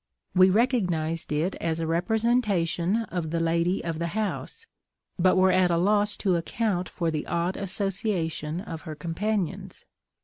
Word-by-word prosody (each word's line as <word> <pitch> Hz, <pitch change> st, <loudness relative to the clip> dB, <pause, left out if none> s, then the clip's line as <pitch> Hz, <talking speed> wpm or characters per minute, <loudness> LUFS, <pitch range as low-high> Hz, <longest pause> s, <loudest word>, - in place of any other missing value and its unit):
We 185 Hz, 0 st, +6 dB
recognised 180 Hz, -, +1 dB
it 155 Hz, +6 st, 0 dB
as 165 Hz, -1 st, -1 dB
a 165 Hz, -, -1 dB
representation 195 Hz, 0 st, +1 dB
of 170 Hz, -3 st, -3 dB
the 165 Hz, +1 st, -1 dB
lady 170 Hz, +3 st, +1 dB
of 165 Hz, -2 st, -3 dB
the 170 Hz, -, -1 dB
house; 220 Hz, -, -3 dB, 0.5 s
but 185 Hz, +1 st, +4 dB
were 185 Hz, 0 st, +5 dB
at 185 Hz, -1 st, +4 dB
a 170 Hz, -, +2 dB
loss 205 Hz, +3 st, +2 dB
to 185 Hz, -3 st, +3 dB
account 185 Hz, +1 st, -1 dB
for 170 Hz, -2 st, -1 dB
the 155 Hz, -1 st, -3 dB
odd 170 Hz, +2 st, -1 dB
association 185 Hz, -5 st, -2 dB
of 165 Hz, -4 st, -7 dB
her 160 Hz, -4 st, -7 dB
companions. 180 Hz, +4 st, -3 dB
180 Hz, 150 wpm, -26 LUFS, 165-205 Hz, 0.5 s, We